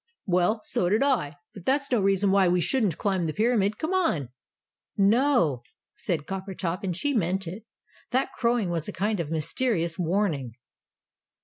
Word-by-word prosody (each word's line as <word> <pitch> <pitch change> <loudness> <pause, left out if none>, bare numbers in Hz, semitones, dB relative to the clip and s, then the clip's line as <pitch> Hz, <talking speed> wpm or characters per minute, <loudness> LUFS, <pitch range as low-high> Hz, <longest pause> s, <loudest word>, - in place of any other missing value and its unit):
"Well, 180 +4 +1
so 175 - 0
did 215 +7 +3
I; 235 - +1 0.2
but 195 - -11
that's 280 +1 +1
no 240 -4 +3
reason 195 0 +2
why 195 -1 +4
we 180 +1 +2
shouldn't 195 +2 +1
climb 190 -4 0
the 155 - -2
Pyramid. 215 -2 +2
Come 320 +4 -2
on!" 245 - +1 0.7
"No," 205 - +3 0.3
said 160 -5 -2
Coppertop, 190 -2 -4
and 180 -3 -2
she 290 +7 0
meant 190 -3 0
it. 190 +6 -8 0.4
"That 260 +3 0
crowing 235 -6 0
was 165 -2 -2
a 210 - -5
kind 210 0 -1
of 160 -3 -3
mysterious 165 +2 -1
warning!" 165 - -1
195 Hz, 165 wpm, -26 LUFS, 170-230 Hz, 0.7 s, why